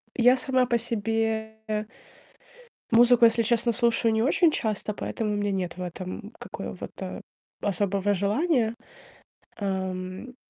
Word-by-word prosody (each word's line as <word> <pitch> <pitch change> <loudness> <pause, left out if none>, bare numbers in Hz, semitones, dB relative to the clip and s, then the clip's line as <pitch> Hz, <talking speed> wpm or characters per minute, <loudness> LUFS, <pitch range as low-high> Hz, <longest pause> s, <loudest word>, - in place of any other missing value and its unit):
Я 250 +2 +5
сама 260 -1 +2
по 240 -1 +2
себе 220 -1 -2 1.0
музыку, 240 +1 +6
если 230 0 +4
честно, 235 +1 +2
слушаю 235 -1 +2
не 220 - +2
очень 315 +5 +4
часто, 215 -4 -2
поэтому 210 +1 -3
у - - -1
меня 205 0 0
нет 185 -2 -3
в - - -6
этом 185 +4 -6
какого-то - - -7 0.4
особого 200 0 0
желания. 225 - +1 0.8
Ам, 190 +3 -4
220 Hz, 120 wpm, -26 LUFS, 200-235 Hz, 1.0 s, музыку